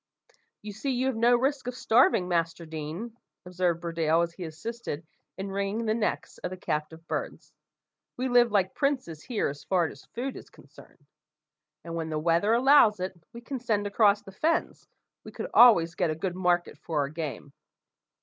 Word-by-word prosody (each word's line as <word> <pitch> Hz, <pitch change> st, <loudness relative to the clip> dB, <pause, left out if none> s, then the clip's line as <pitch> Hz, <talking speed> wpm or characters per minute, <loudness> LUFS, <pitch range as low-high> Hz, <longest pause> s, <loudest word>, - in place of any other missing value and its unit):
"You 210 Hz, -1 st, -7 dB
see 215 Hz, +7 st, -4 dB
you 255 Hz, 0 st, 0 dB
have 265 Hz, -2 st, 0 dB
no 235 Hz, +2 st, +4 dB
risk 270 Hz, +1 st, 0 dB
of 250 Hz, -, -3 dB
starving, 235 Hz, -, +3 dB
Master 170 Hz, -1 st, -1 dB
Deane," 160 Hz, +9 st, -6 dB, 0.3 s
observed 180 Hz, -2 st, -1 dB
Burdale, 165 Hz, -1 st, +1 dB
as 170 Hz, 0 st, -4 dB
he 180 Hz, 0 st, -7 dB
assisted 165 Hz, -1 st, -6 dB, 0.3 s
in 195 Hz, 0 st, -5 dB
ringing 200 Hz, +3 st, -2 dB
the 215 Hz, -, +1 dB
necks 220 Hz, -1 st, -2 dB
of -, -, -4 dB
the 185 Hz, -, -7 dB
captive 160 Hz, 0 st, -4 dB
birds. -, -, -5 dB, 0.6 s
"We 255 Hz, +1 st, -1 dB
live 245 Hz, -2 st, +4 dB
like 190 Hz, -3 st, +1 dB
princes 260 Hz, -, -1 dB
here, 235 Hz, +2 st, -1 dB
as 145 Hz, 0 st, -7 dB
far 180 Hz, -3 st, +1 dB
as 160 Hz, -, -8 dB
food 255 Hz, +3 st, -5 dB
is -, -, -11 dB
concerned; -, -, -18 dB, 0.8 s
and 170 Hz, -, -7 dB
when 165 Hz, -1 st, -3 dB
the 155 Hz, -, -2 dB
weather 170 Hz, +6 st, +2 dB
allows 240 Hz, -4 st, +5 dB
it, 185 Hz, +1 st, -3 dB
and 170 Hz, -3 st, -26 dB
we 235 Hz, -, -10 dB
can 265 Hz, +2 st, -5 dB
send 215 Hz, -4 st, 0 dB
across 205 Hz, 0 st, +3 dB
the 195 Hz, -, -11 dB
fens, 315 Hz, +12 st, -1 dB, 0.4 s
we -, -, -10 dB
could -, -, -6 dB
always 170 Hz, -9 st, +7 dB
get 175 Hz, -1 st, 0 dB
a 155 Hz, -, -1 dB
good 175 Hz, +3 st, -3 dB
market 175 Hz, -4 st, 0 dB
for 155 Hz, -2 st, -2 dB
our 140 Hz, -, -2 dB
game." 150 Hz, -2 st, -6 dB
190 Hz, 190 wpm, -27 LUFS, 165-235 Hz, 0.8 s, always